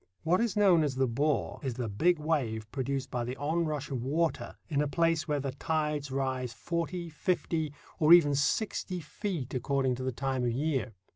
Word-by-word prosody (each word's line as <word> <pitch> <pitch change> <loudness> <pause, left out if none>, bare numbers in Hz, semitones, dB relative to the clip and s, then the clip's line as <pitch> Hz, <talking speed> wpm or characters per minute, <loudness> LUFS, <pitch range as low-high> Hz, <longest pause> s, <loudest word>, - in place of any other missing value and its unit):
What 175 +5 +3
is 230 -3 0
known 190 -5 +6
as 140 -3 -1
the 130 0 +2
"bore" 140 +5 0
is 130 -4 -3
the 125 -2 -3
big 165 - +2
wave 135 -9 -1
produced 135 0 -2
by 120 -1 -1
the 125 +2 -4
onrush 150 -1 -1
of 130 -3 -2
water 155 +6 -1
in 145 -3 +1
a 150 - +1
place 165 +1 +1
where 150 -2 0
the 135 -1 -2
tides 150 0 -1
rise 130 -2 -2
forty, 170 +5 -3
fifty, 160 -1 -1 0.3
or 155 0 +4
even 165 -5 +8
sixty 180 +5 0
feet, 155 - -4
according 135 0 +1
to 130 - -5
the 130 - -1
time 130 +1 -2
of 120 -1 +1
year. 130 -5 -1
145 Hz, 190 wpm, -30 LUFS, 130-165 Hz, 0.3 s, even